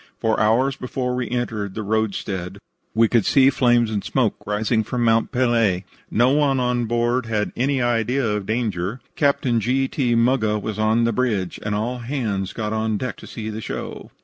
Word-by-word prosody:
For 110 -1 +1
hours 120 +5 +3
before 125 0 -3
we 125 -2 -2
entered 110 -5 -3
the 110 - -3
roadstead 100 -3 -2 0.4
we 115 0 +5
could 115 -1 +2
see 135 +4 +5
flames 120 -3 +3
and 105 -3 -2
smoke 80 - +1
rising 110 +2 +1
from 120 +2 -2
Mont 115 0 +2
Pelee. 115 -8 +2 0.3
No 120 +3 +3
one 140 -2 +2
on 125 -1 0
board 120 +1 0
had 105 -2 -1
any 130 0 +1
idea 120 +2 +1
of 105 -2 -2
danger. 110 -1 -2 0.2
Captain 135 -5 +2
G. 130 +5 +1
T. 125 -5 0
Muggah 115 -3 +2
was 110 +1 -5
on 110 +2 +3
the 115 0 +1
bridge, 105 -7 -1
and 105 0 -2
all 120 +4 -2
hands 115 -7 -2
got 110 -1 -3
on 110 -1 0
deck 125 +3 -4
to - - -12
see 110 -2 -6
the 110 +1 -5
show. - - -6
115 Hz, 185 wpm, -22 LUFS, 105-125 Hz, 0.4 s, we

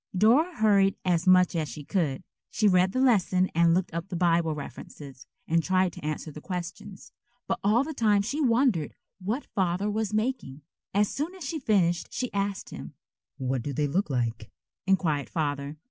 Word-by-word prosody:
Dora 270 - +4
hurried 200 -3 +3
as 175 0 +1
much 180 -1 +5
as 155 -3 -1
she 150 - -8
could. 150 -5 -1 0.3
She 215 - +1
read 185 -1 +4
the 255 - -1
lesson 190 -7 +3
and 170 0 +4
looked 185 -2 -1
up 170 +2 -4
the 180 - -4
Bible 170 -2 +2
references 140 -2 -10 0.2
and 165 +1 +2
tried 185 +1 +1
to - - -11
answer 155 +1 -4
the 150 - -10
questions. 180 +2 -7 0.4
But 230 - -1
all 215 +6 +3
the 315 +2 -5
time 210 -6 +2
she 280 +9 -2
wondered 235 - +2 0.3
what 225 +9 -2
Father 190 +2 -1
was 215 -1 -2
making. 215 - -2 0.3
As 205 +1 +2
soon 315 - -4
as 365 -5 -8
she 315 +2 -3
finished 180 - +1
she 250 - -3
asked 200 -1 -2
him. - - -9 0.4
"What 130 -1 -2
do 140 +4 -4
they 150 +2 0
look 170 +5 0
like?" 115 -4 -2 0.4
inquired 160 -7 +1
Father. 145 -2 -3
185 Hz, 180 wpm, -27 LUFS, 155-215 Hz, 0.4 s, much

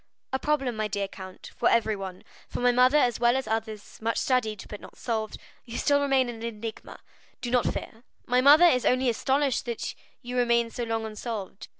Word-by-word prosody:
"A 265 - +1
problem, 275 -5 0
my 215 0 -1
dear 200 -1 -2
count, 190 -1 -11
for - - +2
everyone—for 195 -5 -2
my 245 0 +4
mother 250 +4 +5
as 245 -5 +2
well 240 +2 +4
as 265 - -3
others; 220 -1 -4
much 230 +1 -1
studied, 220 -6 0
but 210 - -8
not - - -13
solved, 220 -3 -3 0.3
you 235 - -7
still 285 -1 +3
remain 270 -2 +2
an 230 -2 -7
enigma, 225 -1 -6 0.4
do 245 -2 -4
not 245 -2 +2
fear. 225 +2 -7 0.2
My 250 +1 +3
mother 295 +6 +8
is 250 -8 +4
only 255 0 +3
astonished 270 +3 +1
that 235 -2 -4 0.3
you 250 +1 -4
remain 235 -1 +2
so 240 - -3
long 225 -1 -2
unsolved. 215 -2 -6
235 Hz, 190 wpm, -27 LUFS, 220-255 Hz, 0.4 s, mother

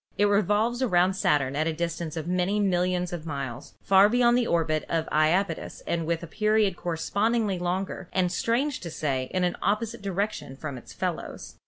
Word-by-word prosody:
It 205 - +4
revolves 210 +4 +2
around 185 -6 +3
Saturn 140 -8 +1
at 155 +2 +1
a 165 - 0
dis 170 +1 -2
tance 165 -1 -5
of 160 - -3
many 180 +3 +1
millions 180 -2 +1
of 165 -2 -6
miles, 135 -4 -5
far 195 +1 +6
beyond 240 +1 +4
the 245 -1 +2
orbit 155 -2 +1
of 165 -1 0
Japetus 165 +3 +1
and 165 -2 -1
with 170 0 -1
a - - -3
period 215 +2 +1
correspondingly 200 +5 0
longer, 180 +1 -3
and, 180 -2 +1
strange 250 +9 0
to 170 - -6
say, 135 -5 -2
in 185 -1 0
an 175 -1 0
opposite 215 +1 -1
direction 200 -7 -3
from 145 0 -6
its 125 - -11
fellows. - - -5
180 Hz, 185 wpm, -26 LUFS, 160-205 Hz, -, far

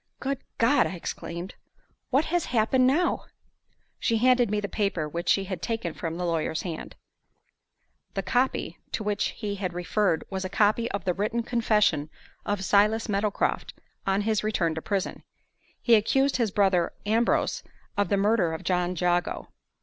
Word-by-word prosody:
"Good 275 0 -2 0.2
God!" 245 +3 +4
I 185 - -5
exclaimed, 170 +1 -6 0.6
"what 275 +4 +3
has 345 +1 0
happened 255 +2 +3
now?" 330 +7 +1 0.7
She 230 - +1
handed 245 0 +4
me 210 0 0
the 205 - -3
paper 195 -7 -1
which 170 +3 -4
she 195 - +4
had 185 -3 -5
taken 225 -8 -2
from 165 +1 -4
the 180 - -2
lawyer's 165 -1 -1
hand. 170 -4 -6 1.2
The 195 - -1
"copy" 245 +8 0
to 220 - -2
which 210 -1 0
he 210 -2 -4
had 185 -3 -3
referred 180 0 +1
was 190 0 -3
a 185 - -3
copy 215 +4 +2
of 200 -4 -4
the 180 - +2
written 215 +5 -1
confession 210 -10 +2 0.4
of 205 -2 -1
Silas 210 +3 +3
Meadowcroft 200 0 -1 0.3
on 195 +1 +2
his 215 -1 0
return 180 -6 +1
to 160 - -4
prison. 200 +1 -2 0.6
He 235 - +3
accused 270 +6 +3
his 235 -4 +1
brother 190 -4 +2
Ambrose 225 +3 +1 0.3
of 205 0 +1
the 200 - +2
murder 200 -4 +2
of - - -8
John 180 0 0
Jago. 175 +1 0
205 Hz, 165 wpm, -27 LUFS, 180-230 Hz, 1.2 s, God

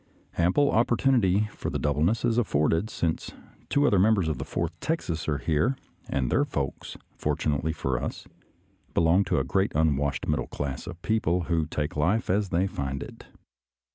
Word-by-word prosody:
Ample 95 +12 +3
opportunity 115 -4 +3
for - - -5
the - - -2
doubleness 80 - +1
is 120 0 +2
afforded, 80 -1 +1
since 85 -7 -2 0.4
two 145 +1 +3
other 100 -9 +4
members 100 -3 +3
of 75 -5 -2
the - - -2
Fourth 85 +1 -3
Texas 85 - -2
are 75 - +1
here, 80 - +1 0.3
and 65 -3 0
their 140 - +3
folks, 70 - -4 0.2
fortunately 75 0 0
for 65 -5 -2
us, - - -5 0.7
belong 85 +4 +4
to - - 0
the - - +2
great 95 +1 +1
unwashed 70 -3 +1
middle - - 0
class 70 0 -5
of 90 -1 -7
people 90 -6 +1
who 80 -2 0
take 75 0 -3
life 90 +8 +1
as 100 0 +1
they 90 +2 +1
find 70 -7 -3
it. - - -12
85 Hz, 170 wpm, -27 LUFS, 75-105 Hz, 0.7 s, other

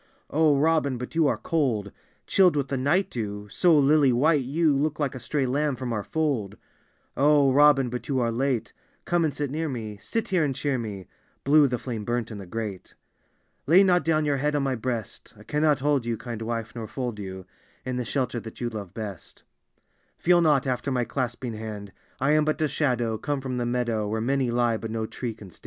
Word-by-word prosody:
"O 155 -1 +4
Robin, 150 -3 +2
but 125 +1 -7
you 165 -2 +3
are - - +1
cold 120 -11 -1 0.2
— - - -39
Chilled 185 -4 +4
with 140 -2 -1
the 135 - -1
night 145 +9 +1
dew; 105 -3 -4
so 175 -4 +4
lily 145 -1 +5
white 145 +5 +3
you 150 +4 +2
Look 150 +2 -1
like 145 -3 0
a 130 - -7
stray 140 +1 -1
lamb 140 +2 0
from 125 -1 -4
our 105 - -1
fold. 140 -11 -1 0.3
" - - -40 0.2
O 145 -1 +4
Robin, 140 -1 +5
but 125 0 -5
you 135 -2 0
are 120 -1 +1
late: 125 0 -1 0.3
Come 175 -1 +1
and 155 - +1
sit 145 -2 -3
near 160 +2 -2
me 110 -5 -5
— - - -24
sit 225 -2 -3
here 185 -4 +2
and 140 -3 -1
cheer 140 -2 -1
me." 100 -5 -6 0.2
— - - -40
(Blue 145 +1 +5
the 125 -2 -1
flame 115 -3 -5
burnt 120 +1 -2
in 105 - -7
the 95 - -9
grate.) 105 -1 -6 0.7
"Lay 175 +6 +7
not 180 -2 +3
down 155 -2 +1
your 145 -1 +1
head 150 +2 0
on 145 - +1
my 135 -1 0
breast: 120 -3 -5
I - - -14
cannot 150 -2 +1
hold 145 -2 +2
you, 115 -1 -1
kind 115 -2 -6
wife, 115 -1 -3
nor 115 -2 -6
fold 120 -4 -4
you 95 -2 -7 0.4
In 130 -1 -2
the 125 - -1
shelter 125 0 -2
that 110 0 -10
you 120 - -2
love 100 -5 -7
best 100 -8 -8 0.7
"Feel 175 0 +4
not 150 -5 +3
after 125 +1 -1
my 125 -2 +1
clasping 120 -1 -3
hand: 105 -2 -7 0.3
I 135 +3 +2
am 155 0 +4
but 155 0 0
a 155 - +2
shadow, 120 -7 0
come 145 -1 -2
from 130 -2 -4
the 120 -1 -1
meadow, 120 -3 -1
Where 110 +2 -2
many 130 +2 0
lie, 120 -1 +1
but 115 - -6
no 110 0 -2
tree 115 0 -5
can 100 -4 -12
stand. - - -16
130 Hz, 225 wpm, -26 LUFS, 115-150 Hz, 0.7 s, Lay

